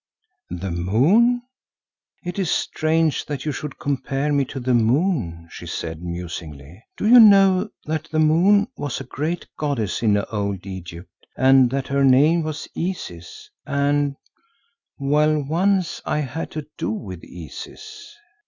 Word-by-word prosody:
"The 90 +1 -4
moon! 160 - +3 0.8
It 180 +1 -5
is 185 -4 0
strange 160 -1 0
that 145 -2 -5
you 150 - 0
should 145 0 -6
compare 140 +1 -1
me 140 -1 +2
to 135 - -7
the 130 0 0
moon," 120 - +1
she - - -9
said 80 0 -5
musingly. 85 -1 -7
"Do 210 - -1
you 245 +2 +9
know 195 -2 +6 0.2
that 155 0 -2
the 160 - -4
moon 180 +7 +4
was 145 -3 -4
a - - -6
great 155 +7 -3
goddess 135 -10 -1
in 105 -3 +3
Old 100 -2 -3
Egypt 90 -2 -8 0.3
and 130 -1 +5
that 135 +1 -2
her 140 0 +2
name 145 +6 +5
was 155 -1 -5
Isis 90 - -6 0.2
and—well, 140 0 +1 1.3
once 180 +4 0
I - - -1
had 150 +2 -3
to 155 -1 -5
do - - -1
with 95 -5 -5
Isis? 85 - -10
140 Hz, 140 wpm, -22 LUFS, 100-160 Hz, 1.3 s, you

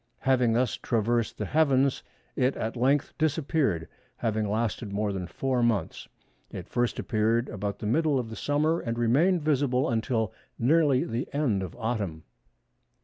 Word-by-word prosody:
Having 125 -3 +3
thus 120 0 +1
traversed 115 0 0
the - - -3
heavens, 140 -3 +2 0.3
it 130 +2 +1
at 110 +2 -3
length 135 +4 +1
disappeared, 145 - 0 0.3
having 110 -2 -1
lasted 110 0 -2
more 100 0 -1
than 90 -2 -4
four 130 +5 -1
months. 115 -4 0 0.4
It - - -8
first 120 -1 -1
appeared 115 +2 +1
about 100 0 -4
the - - -7
middle 150 +6 +2
of 120 -3 -3
the - - -6
summer, 155 +5 +1
and 115 0 -3
remained 150 +9 +3
visible 135 -3 +1
until 110 -2 -1 0.2
nearly 140 +1 +3
the 115 +3 -4
end 125 -10 +1
of 95 -3 -6
autumn." 105 -9 -3
120 Hz, 150 wpm, -27 LUFS, 110-140 Hz, 0.4 s, Having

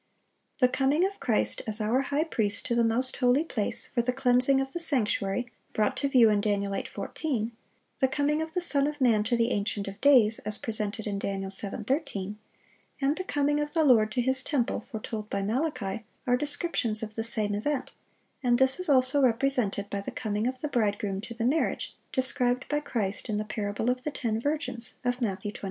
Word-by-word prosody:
The 250 - +5
coming 275 +7 +2
of 395 +1 -4
Christ 225 - +1
as 215 0 -2
our 225 +5 +1
high 285 +2 0
priest 220 -8 0
to 255 - -1
the 235 0 +3
most 240 +3 +4
holy 255 +3 +3
place, 225 -10 -2
for 240 - -1
the 245 +2 0
cleansing 255 +1 +3
of 270 0 -2
the 345 - -3
sanctuary, 240 -6 0 0.2
brought 215 -1 +1
to 280 - 0
view 250 -4 +6
in 205 -1 +2
Dan. 205 -1 +1
8:14; 220 +4 -3 0.5
the 265 - +4
coming 290 +3 0
of 320 0 -5
the 360 - +1
Son 285 -5 +2
of 295 0 -4
man 230 -5 +3
to 240 +1 +1
the 230 0 +1
Ancient 200 0 -2
of 195 0 -8
days, 245 -6 +5
as 210 -1 0
presented 215 -1 -3
in 200 -2 -2
Dan. 195 -1 -3
7:13; 205 - -2 0.6
and 275 +2 +1
the 370 - -4
coming 290 -4 +1
of 295 0 -3
the 325 -2 +3
Lord 225 -6 +5
to 250 - +1
His 260 +1 +1
temple, 245 -5 -1
foretold 215 -3 -5
by 200 0 -2
Malachi, 230 -2 -2 0.2
are 245 - +3
descriptions 285 -6 0
of 215 -1 -5
the 225 - -3
same 215 -3 +1
event; 265 +6 -2 0.5
and 245 -2 +3
this 265 +5 +2
is 365 -3 -4
also 265 +1 +4
represented 235 -5 +1
by 200 - -2
the - - -6
coming 215 0 -2
of 255 0 -4
the 300 - -1
bridegroom 205 -6 -1
to 235 +2 -8
the 230 0 -2
marriage, 295 +6 0 0.2
described 250 -1 +1
by 295 - +1
Christ 220 -7 -2
in 210 - 0
the 215 - -2
parable 215 +2 -1
of 250 0 -4
the - - -1
ten 230 -6 -2
virgins, 285 -5 -3
of 245 +1 0
Matthew 205 -2 -2
25. - - -10
245 Hz, 205 wpm, -28 LUFS, 215-275 Hz, 0.6 s, view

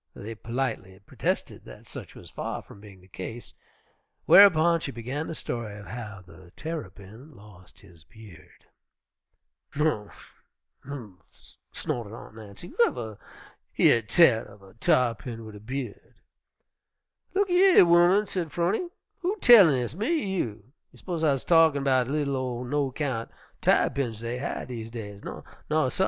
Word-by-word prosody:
They 110 +3 -7
politely 115 -5 -4
protested - - -3
that - - -13
such - - -10
was - - -13
far - - -5
from 100 - -15
being 100 -3 -14
the 90 - -20
case, 105 +5 -8 0.7
whereupon 170 -4 +7
she 145 - -5
began 130 +6 -5
the 165 - -5
story 115 -7 -5
of 105 - -11
how 110 -5 -8
the 90 0 -16
Terrapin 125 - -8
lost 100 -4 -17
his 85 -6 -18
beard. 90 -3 -16 1.1
"Um 140 -9 0 0.8
umph!" 120 -10 -12
snorted 115 -3 -4
Aunt 115 - -12
Nancy, 110 - -11
"who - - -16
uver 115 - 0 0.6
year 115 - +5
tell 115 0 +4
uv 100 -1 -16
a - - -23
tarr'pin 120 -3 0
wid 110 - -10
a 105 - -10
by'ud!" 120 0 -7 1.2
"Look 395 -1 +1
a - - +2
yer, 370 - +7
ooman," 175 +4 +5
said 175 -6 -4
'Phrony, 195 - 0 0.3
"who 375 +2 -1
tellin' 200 - +8
dis, 125 -2 -2
me 205 +7 -3
er 325 -8 0
you? 110 - -3 0.3
You - - -19
s'pose 170 -3 -4
I'se 140 -4 +2
talkin' 160 -4 +4
'bout 130 -2 +3
de - - -4
li'l 145 -2 0
ol' 125 -2 -3
no 140 +1 -1
kyount 130 -5 -3 0.3
tarr'pins 120 -6 +1
dey 120 +1 -4
has 140 - -4
dese 115 -3 -6
days? 105 -3 -8
Naw, 155 -3 -3
suh! - - -9
125 Hz, 155 wpm, -26 LUFS, 105-155 Hz, 1.2 s, tellin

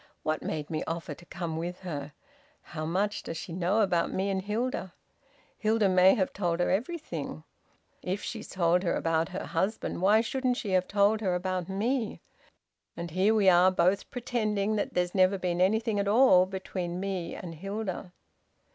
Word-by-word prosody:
What 155 0 -1
made 150 -1 -4
me 155 - -1
offer 165 -2 -4
to 175 - -15
come 170 -2 -4
with 175 +3 -4
her? 145 -5 -5 0.5
How 155 -1 -5
much 200 +5 0
does 165 - -6
she 170 - -7
know 185 +5 +1
about 175 -5 +1
me 195 +1 -1
and 190 -1 -1
Hilda? 210 -2 -3 0.6
Hilda 215 -2 +2
may 185 +1 +6
have 190 -5 0
told 175 -3 -1
her 175 - +2
everything. 290 - -3 0.6
If 190 +3 -3
she's 225 - -5
told 175 -1 +2
her 180 - 0
about 165 +1 0
her 190 - -5
husband 190 +1 -2
why 210 +4 +5
shouldn't 255 +1 -1
she 205 - -3
have 185 -1 +2
told 205 +2 +3
her 185 -4 +1
about 185 0 -2
me? 225 +4 -1 0.8
And 170 -1 -5
here 190 +6 +3
we 205 -3 +3
are 180 0 +7
both 185 +2 +1
pretending 215 -5 -1
that 205 - -2
there's 180 0 0
never 190 0 +4
been 180 -1 -1
anything 220 +2 +2
at 200 - 0
all 200 -5 +6
between 185 -2 -4
me 190 -3 -3
and 175 -2 -7
Hilda!" 195 +1 -5
190 Hz, 175 wpm, -29 LUFS, 175-210 Hz, 0.8 s, are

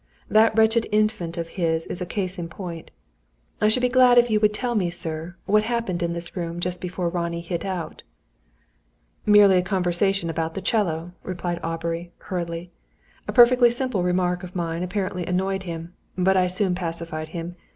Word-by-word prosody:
That 220 0 +4
wretched 225 +1 +4
Infant 210 -5 0
of 165 -1 -3
his 160 -1 +1
is 180 - -6
a 180 - -3
case 185 -1 -3
in 170 -1 -4
point. 170 -2 -7 0.7
I 210 - +5
should 250 +4 +3
be - - +5
glad 250 -1 +5
if 240 -1 +5
you 215 - +3
would 210 -1 +4
tell 240 +3 -2
me, 190 -6 +1
sir, 165 0 -5
what 210 +1 +4
happened 230 -7 -2
in 170 0 0
this 170 +2 -6
room 170 -1 -4
just 180 0 -3
before 180 -1 -3
Ronnie 170 -1 -2
hit 170 0 -4
out." 185 -4 -4 1.3
"Merely 205 -2 +7
a - - +4
conversation 185 0 0
about 165 0 -2
the 195 - -3
'cello," 175 -6 0
replied 175 -1 -4
Aubrey, 165 +1 -3
hurriedly. 175 -1 -5 0.6
"A - - -1
perfectly 245 0 +7
simple 240 -4 -1
remark 180 0 +1
of 180 -1 -9
mine 170 -1 -2
apparently 180 0 -2
annoyed 190 +1 0
him. 165 +1 -6 0.2
But 190 +1 +3
I 185 -1 +3
soon 185 +1 0
pacified 165 -3 -3
him. 170 +2 -6
180 Hz, 180 wpm, -24 LUFS, 170-205 Hz, 1.3 s, Merely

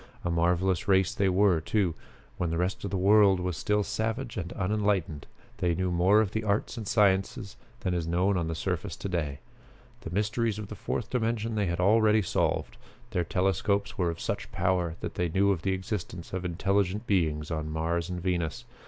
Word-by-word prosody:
A 85 - 0
marvelous 90 +1 +1
race 95 -2 +3
they 100 -1 +2
were, 95 -3 +3
too. 85 +1 +1 0.4
When 90 - -1
the 80 - -1
rest 90 +3 -1
of 100 - -2
the 95 - -1
world 100 0 +5
was 90 -1 -2
still 105 +6 +1
savage 115 +5 -3
and 90 -4 -4
unenlightened, 100 -6 -1 0.3
they 85 -2 +1
knew 95 0 -1
more 95 +5 +4
of 105 -4 -1
the 110 - -2
arts 105 +3 0
and 110 -4 -6
sciences 95 -2 +1 0.3
than 90 - -1
is 85 -2 -1
known 90 +4 +2
on 85 -3 0
the 80 - -2
surface - - -3
to - - -5
day. 75 -7 -2 0.6
The - - -7
mysteries 105 +4 0
of 105 -2 -6
the - - -6
Fourth - - -4
Dimension 115 -2 -1
they 105 -3 0
had 85 0 -2
already 110 +2 +4
solved. 85 - -1 0.3
Their 90 -5 0
telescopes 95 +3 0
were 90 -3 +1
of 85 0 -5
such - - -3
power 90 -2 0
that - - -4
they 90 -1 -1
knew 100 +4 +3
of 90 -5 -1
the 95 +1 0
existence 95 -2 -5
of 95 0 -3
intelligent 95 +4 0
beings 80 -6 0
on 80 -1 -2
Mars 85 +2 -1
and 90 -1 -3
Venus. 90 +5 -2
95 Hz, 195 wpm, -28 LUFS, 85-105 Hz, 0.6 s, world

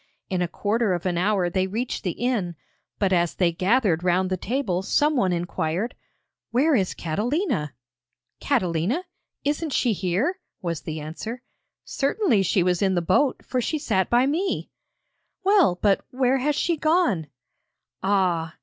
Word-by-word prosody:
In 185 -1 0
a 175 - +1
quarter 210 +3 0
of 175 +1 -3
an 180 -2 0
hour 185 +1 +1
they 185 +2 0
reached 230 +6 -3
the 180 - -1
inn, 225 -9 -1 0.4
but 195 -2 +1
as 175 -2 +1
they 175 -2 +2
gathered 190 -1 +2
round 185 +1 +1
the - - +2
table, 195 -2 -1
someone 245 -1 +2
inquired: 175 +4 -2 0.6
'Where 285 +7 +3
is 195 -8 +1
Catalina?' 210 - -1 0.6
'Catalina? 215 - 0 0.4
Isn't 295 +2 -1
she 240 -4 +2
here?' 200 - -1 0.2
was 170 -3 -3
the 155 -1 -5
answer. 215 +11 -6 0.4
'Certainly 280 - +1
she 185 0 +2
was 180 -1 +1
in 190 -2 +2
the 175 - +2
boat, 250 - +1
for 255 - -1
she 310 - -1
sat 205 -10 0
by 240 +2 +4
me!' 340 +8 -1 0.7
'Well, 375 - +4
but 200 -2 +3
where 260 +1 +1
has 290 +3 +1
she 340 +2 0
gone?' 310 - +2 0.7
Ah! 180 -5 +1
200 Hz, 150 wpm, -24 LUFS, 180-265 Hz, 0.7 s, by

